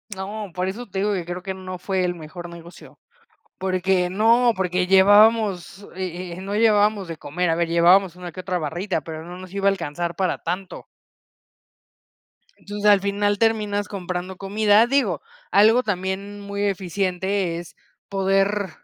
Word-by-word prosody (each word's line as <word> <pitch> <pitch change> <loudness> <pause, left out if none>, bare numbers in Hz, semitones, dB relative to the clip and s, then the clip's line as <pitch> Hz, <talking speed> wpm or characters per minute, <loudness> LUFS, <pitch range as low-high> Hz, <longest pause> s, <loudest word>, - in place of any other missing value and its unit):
No, 200 +1 -6
por 185 0 -1
eso 225 +6 -5
te 195 -1 -4
digo 205 +1 +1
que 185 -3 -2
creo 175 +1 -6
que 190 -1 -4
no 185 -1 -7
fue 185 +1 -1
el 175 0 -1
mejor 170 +2 -9
negocio. 170 0 -13 0.6
Porque 185 -1 +1
no, 230 +5 +4
porque 180 -1 0
llevábamos, 200 0 +4
eh 180 -1 -5
eh - - -7
no 195 +2 -5
llevábamos 210 -3 +3
de 165 - -5
comer. 170 +4 -2
A 165 - +1
ver, 170 0 +1
llevábamos 175 +2 +4
una 180 -1 -8
que 180 - -8
otra 185 0 -2
barrita, 175 +3 -2
pero 160 0 -8
no 175 +1 -9
nos 185 -1 -11
iba 200 0 -2
a - - +7
alcanzar 170 -1 -4
para 185 +1 -1
tanto. 180 +3 -5 1.7
Entonces, 205 +1 -7
al 205 -1 +6
final 205 +1 0
terminas 210 -2 0
comprando 185 -1 -5
comida. 210 +3 +3
Digo, 275 +2 +1 0.3
algo 220 +5 +5
también 195 0 -3
muy 200 0 -4
eficiente 190 -1 -1
es 170 -1 -9 0.3
poder, 195 +1 +1
190 Hz, 160 wpm, -22 LUFS, 180-205 Hz, 1.7 s, a